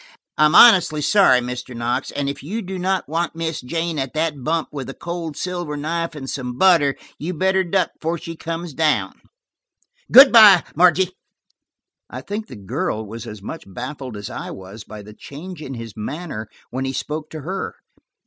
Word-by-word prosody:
I'm 150 +1 +4
honestly 185 -9 +7
sorry, 165 -12 +5
Mr. 125 0 -6
Knox, 120 +3 -1
and 145 -1 -3
if 140 - -4
you 210 +10 -4
do 190 0 -5
not 190 +1 -1
want 165 +2 -2
Miss 165 -1 -3
Jane 165 +4 -3
at 135 +2 -4
that 155 -4 -1
bump 160 +3 -1
with 140 -3 -6
a 135 - -7
cold 170 -3 -5
silver 175 -5 -4
knife 165 +2 -3
and 135 -3 -7
some 125 -2 -5
butter, 165 -7 +4 0.2
you'd 170 +2 -4
better 190 +1 +2
duck 185 0 0
before 165 +2 -3
she 165 +1 -8
comes 165 0 -5
down. 155 +1 0 0.9
Good 270 +2 +10
by, 210 -6 +9
Margie." 180 +2 +4 1.0
I - - -7
think 210 +2 -5
the 125 - -10
girl 105 +2 -3
was 115 +3 -8
as 105 -3 -9
much 160 - -7
baffled 125 +3 -7
as 105 - -6
I - - -6
was 95 +3 -10
by 105 -1 -10
the 105 +1 -12
change 155 - -10
in 135 -3 -6
his 115 -2 -8
manner 110 -1 -6 0.2
when 130 +2 -3
he 135 - -3
spoke 150 +3 -4
to 155 - -7
her. 185 +7 -4
155 Hz, 185 wpm, -21 LUFS, 130-175 Hz, 1.0 s, Good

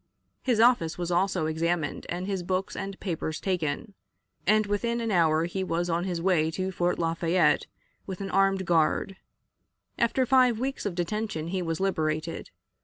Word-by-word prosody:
His 245 -4 +1
office 230 -9 +4
was 175 0 -3
also 180 -1 +1
examined, 160 -1 -1
and 175 +2 -3
his 195 -2 -2
books 185 +2 -2
and 195 0 -5
papers 160 -4 -3
taken, 180 +1 -2 0.5
and 215 +1 +4
within 235 +4 -1
an 230 -1 -2
hour 165 -3 +3
he 190 +2 -3
was 175 -1 -1
on 170 +2 0
his 180 -3 -2
way 165 -3 +2
to 185 +4 -3
Fort 175 -1 0
Lafayette 165 +2 +2 0.4
with 190 -2 -5
an 195 -1 -4
armed 195 0 +2
guard. 170 +3 +1 0.8
After 245 +2 +2
five 250 -2 +4
weeks 265 -3 -2
of 185 - -4
detention 175 -2 -2
he 185 +1 -1
was 165 -1 -2
liberated. 160 -4 -1
185 Hz, 165 wpm, -27 LUFS, 165-200 Hz, 0.8 s, office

